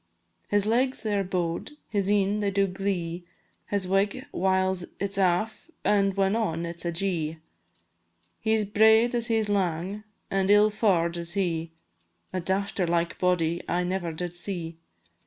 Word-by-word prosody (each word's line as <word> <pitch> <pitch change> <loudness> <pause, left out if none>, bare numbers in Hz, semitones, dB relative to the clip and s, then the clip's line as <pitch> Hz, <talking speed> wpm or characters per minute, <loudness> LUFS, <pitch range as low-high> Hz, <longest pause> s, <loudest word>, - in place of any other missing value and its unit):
His 205 -1 +2
legs 250 +4 +1
they 215 -2 0
are 200 - +1
bow'd, 180 - -2
his 200 -3 0
een 205 0 +2
they 205 -1 +1
do 200 0 +2
glee, 180 -3 -3 0.4
His 200 -2 -1
wig, 200 +7 +1
whiles 190 0 +1 0.2
it 200 0 -2
's 200 - -1
aff, 195 - 0 0.2
and 200 -1 +3
when 195 +1 +2
on, 170 -7 -1
it 170 0 -7
's - - -10
ajee; 170 -2 -1 1.0
He 220 0 +2
's 215 - 0
braid 220 +3 +5
as 235 -1 0
he 225 - +2
's 215 - -1
lang, 190 0 -1 0.3
an' 195 0 +1
ill 210 +1 +6
faur'd 175 -6 +2
is 170 0 -4
he, 170 -4 -1 0.6
A 185 - -1
dafter 190 0 -1
like 170 0 0
body 175 -2 +1
I 180 +1 +1
never 180 -1 -2
did 175 +2 -4
see. 175 -2 -5
190 Hz, 165 wpm, -27 LUFS, 175-205 Hz, 1.0 s, ill